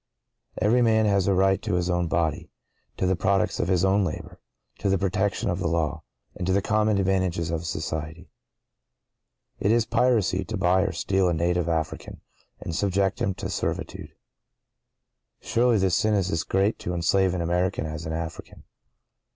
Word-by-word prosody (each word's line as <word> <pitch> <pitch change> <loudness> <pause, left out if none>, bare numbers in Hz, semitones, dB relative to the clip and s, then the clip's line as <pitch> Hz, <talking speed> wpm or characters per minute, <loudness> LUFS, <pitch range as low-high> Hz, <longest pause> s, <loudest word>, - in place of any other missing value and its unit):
Every 110 +6 +3
man 110 -2 +3
has 100 -2 +2
a 100 - +3
right 95 +1 +3
to 105 -5 -1
his 90 0 0
own 90 -1 0
body—to 80 +3 -4
the 95 +1 +2
products 95 +2 +1
of - - 0
his 90 0 +2
own 100 +1 +3
labor—to 95 +3 -6
the 95 - +3
protection 95 +2 -1
of 90 - -2
the 85 - -1
law—and 80 +2 -4
to - - +2
the 100 - +2
common 105 0 +2
advantages 95 -3 0
of 85 0 -3
society. 80 +2 -5 1.3
It 100 - +2
is 115 0 +3
piracy 110 -6 +2
to 110 - -4
buy 95 0 +3
or 100 -1 0
steal 95 +2 +1
a 85 - 0
native 85 +1 0
African, 80 -2 -3 0.4
and 85 - -5
subject 95 +1 0
him 95 - 0
to - - -5
servitude. - - -4 1.2
Surely 120 -1 +2
hte 95 -2 +2
sin 105 +5 +2
is 95 -2 0
as 80 - 0
great 100 +3 +1
to 90 - -4
enslave 95 +2 +2
an 90 - -2
American 90 0 0
as 80 0 -5
an 80 - -4
African. 80 0 -6
95 Hz, 165 wpm, -25 LUFS, 85-100 Hz, 1.3 s, Every